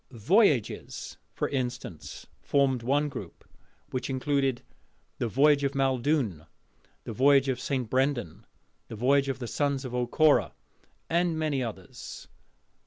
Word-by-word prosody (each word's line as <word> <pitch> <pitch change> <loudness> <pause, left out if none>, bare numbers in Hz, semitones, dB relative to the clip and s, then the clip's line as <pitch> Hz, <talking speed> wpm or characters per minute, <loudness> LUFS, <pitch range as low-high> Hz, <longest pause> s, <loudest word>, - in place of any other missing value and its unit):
'Voyages,' 135 - +1
for - - -2
instance, 125 - -5 0.2
formed 135 -3 +1
one 140 +5 +1
group, 145 - -9 0.4
which 130 - -3
included 135 -1 0 0.6
"The 120 - 0
Voyage 140 +5 +4
of 140 0 -1
Maeldune," 130 - 0 0.6
"The - - -6
Voyage 135 +3 +4
of 130 -2 -1
St. 130 -2 -2
Brendan," 130 - -1 0.4
"The - - -8
Voyage 135 +4 +2
of 135 - -2
the 125 - -6
Sons 140 +2 -1
of 125 - -6
O'Corra," 125 +5 +3 0.5
and 170 -1 +1
many 150 -4 0
others. 105 -7 -7
135 Hz, 125 wpm, -28 LUFS, 120-145 Hz, 0.6 s, Voyage